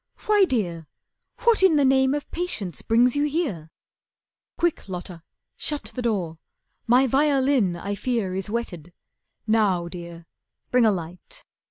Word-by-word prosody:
"Why, 415 Hz, -2 st, +5 dB
Dear, 175 Hz, -, -2 dB, 0.6 s
What 465 Hz, -3 st, +4 dB
in 375 Hz, -4 st, +5 dB
the 285 Hz, -2 st, +3 dB
name 265 Hz, +1 st, +3 dB
of 295 Hz, -, -6 dB
patience 230 Hz, -, -3 dB
brings 240 Hz, +3 st, +3 dB
you 290 Hz, +1 st, +2 dB
here? 280 Hz, -, -2 dB, 0.9 s
Quick, 345 Hz, -, -1 dB
Lotta, 180 Hz, -2 st, -7 dB, 0.4 s
shut 295 Hz, -1 st, -2 dB
the 250 Hz, -, -4 dB
door, 185 Hz, -9 st, -2 dB, 0.5 s
my 250 Hz, +3 st, +5 dB
violin 270 Hz, -7 st, +2 dB
I 195 Hz, +4 st, -4 dB
fear 215 Hz, -3 st, -2 dB
is 190 Hz, +2 st, -3 dB
wetted. 180 Hz, -7 st, -5 dB, 0.5 s
Now, 205 Hz, -6 st, +2 dB
Dear, 170 Hz, -1 st, -9 dB, 0.5 s
bring 245 Hz, -2 st, +4 dB
a -, -, +4 dB
light. 175 Hz, -2 st, -7 dB
225 Hz, 140 wpm, -24 LUFS, 180-275 Hz, 0.9 s, Why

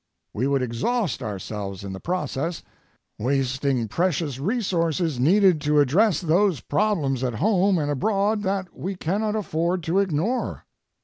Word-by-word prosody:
We 125 Hz, +6 st, 0 dB
would 140 Hz, -2 st, +1 dB
exhaust 140 Hz, -, -1 dB
ourselves 100 Hz, -2 st, -5 dB
in 100 Hz, -1 st, -6 dB
the 95 Hz, -, -6 dB
process, 165 Hz, -, -3 dB, 0.6 s
wasting 130 Hz, 0 st, 0 dB
precious 155 Hz, -, -1 dB
resources 170 Hz, -, 0 dB
needed 180 Hz, +3 st, +4 dB
to 150 Hz, 0 st, +3 dB
address 165 Hz, -, +3 dB
those 175 Hz, -1 st, +2 dB
problems 150 Hz, -, 0 dB
at 125 Hz, -3 st, -1 dB
home 195 Hz, -, +2 dB
and 145 Hz, -2 st, -1 dB
abroad 205 Hz, +8 st, +1 dB
that 190 Hz, -2 st, -2 dB
we 190 Hz, +2 st, -4 dB
cannot 210 Hz, +5 st, -1 dB
afford 175 Hz, -3 st, -1 dB
to 170 Hz, +5 st, +1 dB
ignore. 195 Hz, -, -1 dB
165 Hz, 135 wpm, -24 LUFS, 135-195 Hz, 0.6 s, needed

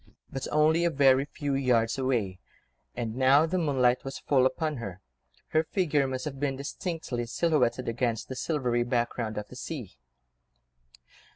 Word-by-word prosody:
But 135 Hz, -, -4 dB
only 155 Hz, +2 st, +4 dB
a 170 Hz, -, +3 dB
very 135 Hz, -3 st, +4 dB
few 145 Hz, -1 st, -4 dB
yards 125 Hz, -3 st, +2 dB
away, 115 Hz, -8 st, 0 dB, 0.6 s
and 115 Hz, -2 st, -3 dB
now 135 Hz, +4 st, +5 dB
the 180 Hz, +3 st, -1 dB
moonlight 130 Hz, -6 st, +2 dB
was 135 Hz, 0 st, -5 dB
full 130 Hz, -2 st, +3 dB
upon 155 Hz, +2 st, -2 dB
her, 100 Hz, -6 st, -6 dB, 0.5 s
her 155 Hz, 0 st, +2 dB
figure 155 Hz, -6 st, +1 dB
must 130 Hz, -1 st, -4 dB
have 135 Hz, -3 st, -5 dB
been 140 Hz, -1 st, 0 dB
distinctly 140 Hz, -3 st, -4 dB
silhouetted 145 Hz, -2 st, +1 dB
against 115 Hz, -1 st, -1 dB
the 130 Hz, -, -6 dB
silvery 125 Hz, -4 st, 0 dB
background 120 Hz, -2 st, -1 dB
of 105 Hz, 0 st, -5 dB
the -, -, -11 dB
sea. 125 Hz, -, -7 dB
130 Hz, 155 wpm, -28 LUFS, 120-150 Hz, 0.6 s, now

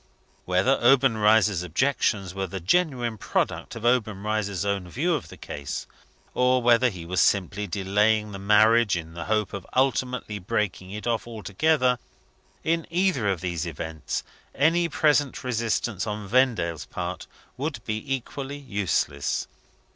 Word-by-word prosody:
Whether 95 Hz, +9 st, +2 dB
Obenreizer's 110 Hz, -6 st, +4 dB
objections 95 Hz, -, 0 dB
were 95 Hz, 0 st, -3 dB
the 95 Hz, +2 st, -5 dB
genuine 120 Hz, -, +1 dB
product -, -, -2 dB
of 115 Hz, 0 st, -6 dB
Obenreizer's 105 Hz, -4 st, 0 dB
own 100 Hz, -3 st, -2 dB
view 165 Hz, -, 0 dB
of 150 Hz, -, -2 dB
the -, -, -11 dB
case, 70 Hz, -2 st, -6 dB, 0.5 s
or 125 Hz, 0 st, +3 dB
whether 120 Hz, +1 st, +4 dB
he 90 Hz, -6 st, -8 dB
was 90 Hz, +2 st, +1 dB
simply 100 Hz, +1 st, +1 dB
delaying 105 Hz, +3 st, +1 dB
the 100 Hz, -, -7 dB
marriage 110 Hz, 0 st, +4 dB
in 80 Hz, -1 st, -7 dB
the 85 Hz, -1 st, -6 dB
hope 105 Hz, -3 st, 0 dB
of 100 Hz, -2 st, -5 dB
ultimately 130 Hz, -4 st, 0 dB
breaking 95 Hz, 0 st, -2 dB
it 105 Hz, +2 st, -6 dB
off 120 Hz, -1 st, -1 dB
altogether 125 Hz, +4 st, +1 dB, 0.6 s
in 165 Hz, +1 st, 0 dB
either 170 Hz, -, +1 dB
of 95 Hz, -4 st, -1 dB
these 85 Hz, -2 st, -2 dB
events, 80 Hz, -1 st, -4 dB, 0.3 s
any 165 Hz, +3 st, +3 dB
present 150 Hz, -3 st, +2 dB
resistance 115 Hz, -4 st, -1 dB
on 105 Hz, -1 st, -4 dB
Vendale's 105 Hz, -, +1 dB
part -, -, -5 dB, 0.3 s
would 145 Hz, +4 st, -3 dB
be 110 Hz, 0 st, -3 dB
equally 135 Hz, +2 st, -6 dB
useless. 100 Hz, -, -1 dB
110 Hz, 140 wpm, -25 LUFS, 95-125 Hz, 0.6 s, Obenreizer's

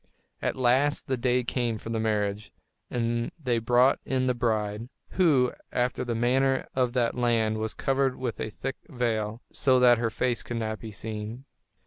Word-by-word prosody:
At -, -, -1 dB
last 130 Hz, +3 st, +2 dB
the 130 Hz, -, 0 dB
day 125 Hz, 0 st, +1 dB
came 120 Hz, -2 st, -1 dB
for 115 Hz, -, -7 dB
the 115 Hz, -, -1 dB
marriage; 105 Hz, -1 st, -1 dB, 0.4 s
and 120 Hz, -1 st, -1 dB
they 125 Hz, -7 st, 0 dB
brought 120 Hz, +3 st, +4 dB
in 130 Hz, -1 st, 0 dB
the 125 Hz, -, +2 dB
bride, 110 Hz, -1 st, -1 dB, 0.2 s
who, 145 Hz, -9 st, +3 dB, 0.2 s
after 125 Hz, +1 st, 0 dB
the 120 Hz, -2 st, -2 dB
manner 130 Hz, +3 st, +2 dB
of 125 Hz, -2 st, +1 dB
that 120 Hz, -2 st, +1 dB
land, 115 Hz, -3 st, +1 dB
was 110 Hz, 0 st, -3 dB
covered 135 Hz, -1 st, +1 dB
with 125 Hz, -4 st, -4 dB
a 110 Hz, -, -2 dB
thick 135 Hz, +5 st, -5 dB
veil, 115 Hz, -4 st, -2 dB
so 130 Hz, -2 st, +3 dB
that 120 Hz, -2 st, +6 dB
her 115 Hz, -1 st, +1 dB
face 120 Hz, +2 st, -1 dB
could 120 Hz, -, -5 dB
not 110 Hz, -1 st, -3 dB
be 110 Hz, -, -8 dB
seen. 110 Hz, +4 st, -6 dB
120 Hz, 175 wpm, -27 LUFS, 110-130 Hz, 0.4 s, that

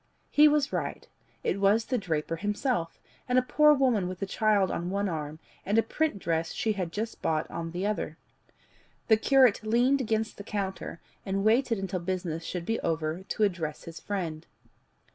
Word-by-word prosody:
He 300 Hz, +1 st, +7 dB
was 295 Hz, -1 st, +2 dB
right; -, -, -3 dB, 0.4 s
it 200 Hz, -, 0 dB
was 210 Hz, +3 st, +4 dB
the 255 Hz, -, 0 dB
draper 165 Hz, -3 st, -2 dB
himself, 205 Hz, -, -1 dB, 0.3 s
and 250 Hz, -, +3 dB
a 255 Hz, -, +5 dB
poor 300 Hz, +4 st, +5 dB
woman 245 Hz, -9 st, +2 dB
with 185 Hz, 0 st, -6 dB
a -, -, +1 dB
child 205 Hz, -1 st, +2 dB
on 175 Hz, +1 st, -3 dB
one 200 Hz, +1 st, 0 dB
arm, 155 Hz, -3 st, -4 dB, 0.3 s
and 205 Hz, +3 st, 0 dB
a 225 Hz, -, +5 dB
print 310 Hz, +1 st, -1 dB
dress 165 Hz, -2 st, -1 dB
she 220 Hz, -, 0 dB
had 180 Hz, -5 st, -3 dB
just 220 Hz, +5 st, -4 dB
bought 155 Hz, -1 st, 0 dB
on 165 Hz, 0 st, -4 dB
the 180 Hz, +4 st, -3 dB
other. 205 Hz, -7 st, -2 dB, 0.9 s
The 220 Hz, -, +7 dB
curate 255 Hz, -1 st, +4 dB
leaned 245 Hz, +5 st, +3 dB
against 220 Hz, -2 st, -1 dB
the 200 Hz, -, -7 dB
counter, 195 Hz, -4 st, -4 dB, 0.2 s
and 195 Hz, 0 st, -1 dB
waited 230 Hz, +2 st, +3 dB
until 190 Hz, -1 st, -3 dB
business 175 Hz, -2 st, -3 dB
should 175 Hz, 0 st, -4 dB
be 225 Hz, +3 st, -1 dB
over 160 Hz, +1 st, -2 dB
to 205 Hz, +3 st, -2 dB
address 170 Hz, -7 st, -1 dB
his 165 Hz, 0 st, -9 dB
friend. 170 Hz, -6 st, -4 dB
200 Hz, 180 wpm, -28 LUFS, 170-225 Hz, 0.9 s, He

